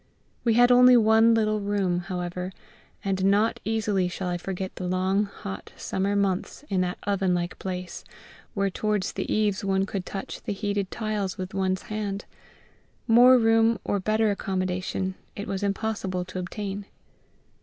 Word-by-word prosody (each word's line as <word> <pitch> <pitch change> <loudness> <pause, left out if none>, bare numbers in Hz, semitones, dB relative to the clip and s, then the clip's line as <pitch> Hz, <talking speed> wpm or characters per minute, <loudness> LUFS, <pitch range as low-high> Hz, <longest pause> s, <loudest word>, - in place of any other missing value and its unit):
We 230 -2 +3
had 245 +1 +6
only 250 0 +8
one 225 +1 +5
little 215 -1 +1
room, 200 -3 0
however, 180 0 -4 0.5
and 190 -1 0
not 205 +3 +3
easily 210 -3 0
shall 180 +1 -4
I 175 - -1
forget 190 +1 -5
the 180 - -3
long 190 +3 +1
hot 95 - -8
summer 195 +2 -1
months 195 +6 -1
in 190 -2 +1
that 180 0 -1
oven 195 -3 +1
like 175 0 -3
place, 180 -1 -5 0.5
where 200 -1 +1
towards 210 0 -1
the - - -3
eaves 210 -2 +1
one 195 0 +1
could 195 -2 -4
touch 195 - -6
the - - -3
heated 200 -1 -2
tiles 210 -3 -3
with 185 0 -5
one's 190 -1 0
hand. 205 -1 -4 0.8
More 245 +2 +7
room 225 0 +4
or 205 - 0
better 215 +2 +2
accommodation 185 -1 -2 0.2
it 205 - -5
was 195 0 -3
impossible 200 -3 -2
to 185 0 -6
obtain. 200 +2 -5
195 Hz, 155 wpm, -26 LUFS, 185-215 Hz, 0.8 s, only